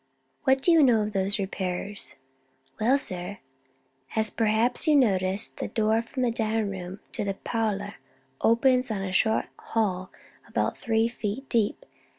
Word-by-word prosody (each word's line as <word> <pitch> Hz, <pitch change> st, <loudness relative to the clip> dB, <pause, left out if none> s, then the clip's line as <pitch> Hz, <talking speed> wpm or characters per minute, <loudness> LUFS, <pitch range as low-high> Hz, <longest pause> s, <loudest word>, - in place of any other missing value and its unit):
"What 265 Hz, 0 st, +3 dB
do 350 Hz, -, +5 dB
you 330 Hz, -2 st, +6 dB
know 235 Hz, -6 st, +5 dB
of 210 Hz, 0 st, -4 dB
those 195 Hz, +1 st, +1 dB
repairs?" 190 Hz, 0 st, -4 dB, 0.6 s
"Well, 250 Hz, +6 st, +4 dB
sir, 185 Hz, -5 st, -4 dB, 0.8 s
as 220 Hz, -1 st, +1 dB
perhaps 225 Hz, +6 st, +1 dB
you 300 Hz, -2 st, +6 dB
have 245 Hz, -6 st, +5 dB
noticed, 190 Hz, +3 st, 0 dB
the -, -, -3 dB
door 220 Hz, 0 st, +1 dB
from 255 Hz, +2 st, -4 dB
the 240 Hz, -, +2 dB
dining 220 Hz, -2 st, -1 dB
room 190 Hz, 0 st, -7 dB
to -, -, -3 dB
the 195 Hz, -1 st, -2 dB
parlor 205 Hz, -2 st, -2 dB, 0.4 s
opens 250 Hz, +2 st, +3 dB
on 205 Hz, -3 st, -2 dB
a 190 Hz, -, -3 dB
short 220 Hz, +4 st, +2 dB
hall 185 Hz, -5 st, -1 dB, 0.4 s
about -, -, -1 dB
three 225 Hz, -1 st, +1 dB
feet 235 Hz, +2 st, -4 dB
deep. 225 Hz, -4 st, 0 dB
220 Hz, 160 wpm, -27 LUFS, 200-235 Hz, 0.8 s, you